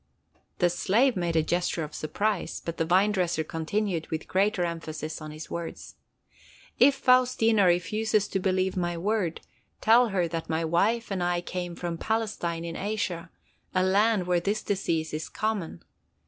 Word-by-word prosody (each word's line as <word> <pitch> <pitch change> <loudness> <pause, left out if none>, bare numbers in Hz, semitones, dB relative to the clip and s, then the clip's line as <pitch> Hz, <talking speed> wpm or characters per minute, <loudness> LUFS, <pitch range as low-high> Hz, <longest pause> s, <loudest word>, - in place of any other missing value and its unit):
The 175 -1 +3
slave 225 +8 +2
made 170 -2 -1
a 160 - +4
gesture 175 0 0
of 150 - -7
surprise, 210 +7 -2
but 170 0 -6
the 165 - +1
vine 190 +5 +4
dresser 175 -5 0
continued 165 +2 -2
with 160 0 -4
greater 195 0 +1
emphasis 160 -2 -5
on 155 - -7
his 155 +1 -9
words. 170 -1 -6 0.9
"If 280 - +6
Faustina 250 -5 +4
refuses 210 +4 +1
to 195 - -1
believe 185 0 0
my 175 -2 -1
word, 190 -2 -1 0.4
tell 235 +2 +5
her 185 -5 0
that 165 0 -5
my 165 0 0
wife 210 +8 +1
and 190 -2 -1
I 175 0 +1
came 175 -1 -5
from 170 -1 -4
Palestine, 210 -7 -2
in 165 -1 -5
Asia, 190 -4 -3 0.5
a 185 - +3
land 200 +1 +3
where 180 -1 +2
this 205 +5 -1
disease 165 -6 -1
is 155 +1 -4
common. 210 - -3
180 Hz, 160 wpm, -27 LUFS, 165-210 Hz, 0.9 s, If